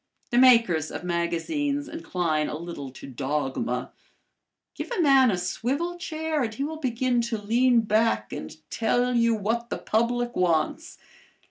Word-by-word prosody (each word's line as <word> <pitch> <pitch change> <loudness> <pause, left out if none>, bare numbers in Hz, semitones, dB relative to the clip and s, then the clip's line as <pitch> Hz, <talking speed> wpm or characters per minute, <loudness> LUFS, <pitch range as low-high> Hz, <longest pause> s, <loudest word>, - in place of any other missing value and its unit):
The 240 - +4
makers 230 - +5
of - - -6
magazines 280 - -1
incline 175 - -1
a 150 - -4
little 165 -5 -7
to 130 - -11
dogma. 130 -2 -2 0.8
Give - - -6
a 485 - -3
man 270 -5 +6
a 190 - +1
swivel 280 - -2
chair 315 -2 -2
and 230 -3 -1
he 220 +5 -4
will 310 +2 -4
begin 250 -2 0
to 235 -1 -2
lean 235 +3 +3
back 215 - +1
and 80 - -7
tell 245 +2 +1
you 230 -1 +3
what 230 +3 -2
the - - -2
public 240 +2 0
wants. 265 - 0
230 Hz, 150 wpm, -26 LUFS, 170-265 Hz, 0.8 s, man